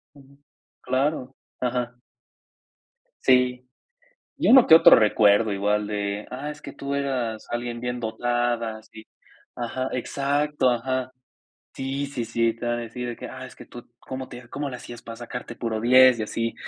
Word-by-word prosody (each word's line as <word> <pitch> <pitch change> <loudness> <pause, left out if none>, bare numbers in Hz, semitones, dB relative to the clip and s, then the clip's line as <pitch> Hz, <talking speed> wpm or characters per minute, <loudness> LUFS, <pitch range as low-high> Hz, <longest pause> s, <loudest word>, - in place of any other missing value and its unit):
Ujú, 140 0 -19 0.4
claro, 130 0 -1 0.3
ajá. 125 -1 -2 1.2
Sí. 125 -1 +3 0.7
Y - - 0
uno 260 -1 +8
que 160 - +9
otro - - +9
recuerdo 105 0 +4
igual 105 +1 0
de: 100 0 -3
"Ah, 140 +4 -5
es 150 0 -12
que - - -8
tú 140 0 -4
eras 125 -6 -2
alguien 120 0 -4
bien 125 0 -3
dotada", 120 -1 -1
sí 110 0 -14 0.5
Ajá, 130 +2 -3
exacto, 140 +2 0
ajá, 130 +1 -1 0.6
sí, 135 +1 -3
sí, 125 -4 -4
sí, 115 0 +1
te 120 - -8
vam 120 0 0
a - - -5
decir 120 +2 -6
de 120 - -4
que: - - -8
"Ah, 130 0 -8
es - - -13
que - - -12
tú, 120 -1 -12
¿cómo 130 0 -7
te 120 -1 -11
cómo 145 -1 -4
le 125 - -6
hacías 120 -1 -10
para 115 -1 -8
sacarte 120 0 -7
puro 110 -2 -3
10?", 125 0 +6
y - - 0
así. 115 +2 -2
125 Hz, 170 wpm, -24 LUFS, 115-130 Hz, 1.2 s, que